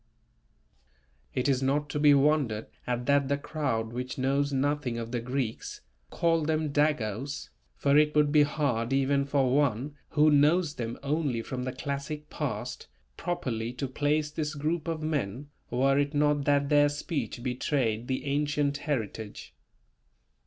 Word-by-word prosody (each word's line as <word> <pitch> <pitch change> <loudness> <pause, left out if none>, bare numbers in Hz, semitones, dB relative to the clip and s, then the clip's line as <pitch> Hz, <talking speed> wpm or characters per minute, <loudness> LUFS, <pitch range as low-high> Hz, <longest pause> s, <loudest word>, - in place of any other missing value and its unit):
It 125 - +1
is 135 -2 +2
not 145 +2 +1
to 150 - -2
be 145 -1 +6
wondered 140 -6 +2 0.2
at 125 0 -1
that 140 0 +3
the 140 +1 +1
crowd 120 -7 -2
which 125 +1 -4
knows 140 +2 +1
nothing 140 -2 0
of 115 0 -5
the 120 - -1
Greeks, 125 -1 -3 0.3
called 165 -3 +1
them 155 -1 0
"Dagos," 140 -2 0 0.3
for 140 0 +2
it 150 0 +2
would 150 -1 +4
be 150 0 +6
hard 135 -5 0
even 140 +1 +2
for 135 -2 +2
one 140 -1 +1 0.2
who 150 +1 +4
knows 150 +3 +4
them 120 -4 -4
only 140 -5 0
from 125 +1 -4
the 130 - -2
classic 140 +3 -5
past, - - -4 0.3
properly 120 - -3
to 130 +2 -3
place 150 +3 0
this 155 0 -3
group 155 +3 -2
of 160 -2 -2
men, 145 -2 -2 0.2
were 135 +3 +2
it 145 +1 0
not 145 -1 +2
that 140 -1 +2
their 145 -1 +5
speech 145 -4 -4
betrayed 125 -3 -1
the 130 +1 -2
ancient 145 0 0
heritage. 115 -8 -4
140 Hz, 150 wpm, -28 LUFS, 125-150 Hz, 0.3 s, be